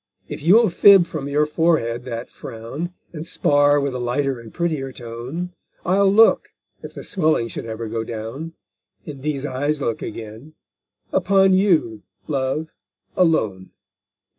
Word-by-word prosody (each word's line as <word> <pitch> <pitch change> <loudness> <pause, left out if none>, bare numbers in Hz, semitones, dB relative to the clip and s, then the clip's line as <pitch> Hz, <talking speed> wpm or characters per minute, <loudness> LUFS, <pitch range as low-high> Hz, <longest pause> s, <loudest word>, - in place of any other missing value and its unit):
if - - -7
you'll 200 +6 +5
fib 195 +1 +7
from 155 -5 -5
your 150 +1 +2
forehead 150 -7 0
that 120 -1 -5
frown, 125 +10 -7 0.2
And 155 -2 -6
spar 145 -3 +3
with 140 -2 -2
a 125 - -4
lighter 130 +2 -1
and 115 -2 -12
prettier 155 -6 -2
tone; 125 +10 -6 0.3
I'll 195 +2 +3
look, 225 +3 +5 0.3
if - - -10
the - - -7
swelling 155 - 0
should 115 - -6
ever 115 0 -5
go 115 +1 -3
down, 115 +9 -6 0.5
And 140 -3 -8
these 145 -1 -2
eyes 145 +2 -1
look 115 -5 -2
again, 115 +8 -8 0.6
upon 195 0 +4
you, 170 - +2 0.3
love, 140 +2 -2 0.5
alone! 110 - +1
145 Hz, 140 wpm, -21 LUFS, 115-170 Hz, 0.6 s, fib